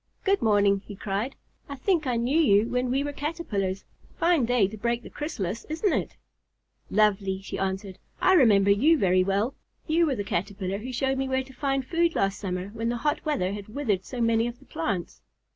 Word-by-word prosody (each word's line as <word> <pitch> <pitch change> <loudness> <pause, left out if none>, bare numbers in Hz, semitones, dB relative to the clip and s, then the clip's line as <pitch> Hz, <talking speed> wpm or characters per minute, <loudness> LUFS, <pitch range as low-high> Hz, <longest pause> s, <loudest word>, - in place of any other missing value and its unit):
"Good 395 0 +2
morning!" 205 -3 +3
he 205 - -7
cried. 205 +7 -3 0.3
"I 280 - -5
think 315 +1 0
I 250 - +1
knew 245 +7 +1
you 220 -7 +4
when 250 0 0
we 270 +3 +1
were 290 0 -4
Caterpillars. 215 - -3 0.3
Fine 330 -6 +3
day 235 -4 +3
to 210 - -8
break 235 +2 -1
the - - -11
chrysalis, 230 - -4
isn't 325 +5 0
it?" - - -2 0.7
"Lovely," 195 -3 +2
she - - -5
answered. 190 0 -3 0.2
"I 375 - +4
remember 205 - +5
you 290 +11 +4
very 185 -5 +3
well. 200 +7 0 0.3
You 330 +1 +3
were 275 - 0
the 205 - -3
Caterpillar 195 +1 -3
who 250 +4 -6
showed 265 +2 0
me 270 0 -1
where 260 0 +1
to 265 0 -15
find 270 0 -1
food 335 +3 +1
last 195 0 0
summer 185 -1 -3
when 230 +2 -3
the 240 - -1
hot 295 +5 -1
weather 195 -11 0
had 205 -1 -7
withered 215 -5 -1
so 250 - -7
many 230 0 +2
of 240 0 -6
the 270 - -20
plants." 220 - -3
235 Hz, 205 wpm, -26 LUFS, 200-275 Hz, 0.7 s, remember